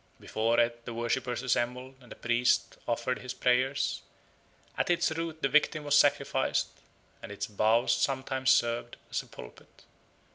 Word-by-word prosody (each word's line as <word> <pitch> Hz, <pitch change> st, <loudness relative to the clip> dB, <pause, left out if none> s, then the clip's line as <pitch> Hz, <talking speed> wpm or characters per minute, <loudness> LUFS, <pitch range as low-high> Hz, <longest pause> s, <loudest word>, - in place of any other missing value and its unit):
Before 115 Hz, +2 st, 0 dB
it 120 Hz, 0 st, 0 dB
the 120 Hz, -, -6 dB
worshippers 120 Hz, +1 st, -2 dB
assembled 125 Hz, +1 st, -1 dB
and 125 Hz, -, -17 dB
the -, -, -8 dB
priest 120 Hz, +1 st, +1 dB
offered 120 Hz, +2 st, -1 dB
his 125 Hz, 0 st, -7 dB
prayers, 130 Hz, +3 st, +1 dB, 0.7 s
at -, -, -1 dB
its 175 Hz, -1 st, +2 dB
roots 160 Hz, 0 st, -4 dB
the -, -, +2 dB
victim 150 Hz, +2 st, +2 dB
was 145 Hz, 0 st, +2 dB
sacrificed, 145 Hz, -1 st, +2 dB, 0.5 s
and 95 Hz, -, -9 dB
its 100 Hz, -, -4 dB
boughs 110 Hz, +3 st, +2 dB
sometimes 130 Hz, -1 st, -1 dB
served 120 Hz, -2 st, +1 dB
as -, -, -1 dB
a -, -, -18 dB
pulpit. -, -, -14 dB
125 Hz, 150 wpm, -29 LUFS, 120-135 Hz, 0.7 s, its